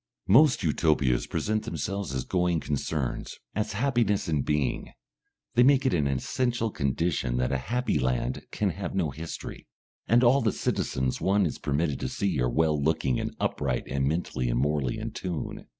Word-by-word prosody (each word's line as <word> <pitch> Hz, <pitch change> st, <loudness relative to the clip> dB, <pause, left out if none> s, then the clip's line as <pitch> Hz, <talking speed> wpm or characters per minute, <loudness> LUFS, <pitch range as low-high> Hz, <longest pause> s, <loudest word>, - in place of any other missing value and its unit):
Most 130 Hz, +2 st, +5 dB
Utopias 75 Hz, -6 st, +2 dB
present 110 Hz, 0 st, -1 dB
themselves 100 Hz, -6 st, -3 dB
as 65 Hz, -, -1 dB
going 90 Hz, -2 st, +1 dB
concerns, 70 Hz, -3 st, -3 dB, 0.2 s
as 105 Hz, -, -2 dB
happiness 115 Hz, -4 st, +1 dB
in 75 Hz, -4 st, +1 dB
being; 75 Hz, -1 st, -1 dB, 0.6 s
they 120 Hz, -, +4 dB
make 135 Hz, +1 st, +5 dB
it 130 Hz, -, +2 dB
an 75 Hz, -5 st, +2 dB
essential 115 Hz, -, -1 dB
condition 70 Hz, -4 st, -1 dB
that 60 Hz, 0 st, 0 dB
a 70 Hz, -, 0 dB
happy 125 Hz, +1 st, +1 dB
land 65 Hz, 0 st, -1 dB
can 100 Hz, -3 st, 0 dB
have 90 Hz, +1 st, -5 dB
no 85 Hz, -6 st, 0 dB
history, 80 Hz, +4 st, -7 dB, 0.4 s
and 120 Hz, +2 st, +4 dB
all 130 Hz, +3 st, +5 dB
the 110 Hz, -, +2 dB
citizens 65 Hz, 0 st, -1 dB
one 100 Hz, +1 st, +3 dB
is 80 Hz, -, -3 dB
permitted 75 Hz, 0 st, -1 dB
to -, -, -2 dB
see 90 Hz, -9 st, -1 dB
are -, -, +2 dB
well 75 Hz, +3 st, +1 dB
looking 75 Hz, -4 st, +1 dB
and -, -, -4 dB
upright 65 Hz, -4 st, -1 dB
and 70 Hz, 0 st, 0 dB
mentally 70 Hz, -6 st, -1 dB
and -, -, 0 dB
morally 70 Hz, -2 st, 0 dB
in -, -, -4 dB
tune. 90 Hz, -4 st, -5 dB
80 Hz, 170 wpm, -27 LUFS, 70-105 Hz, 0.6 s, Most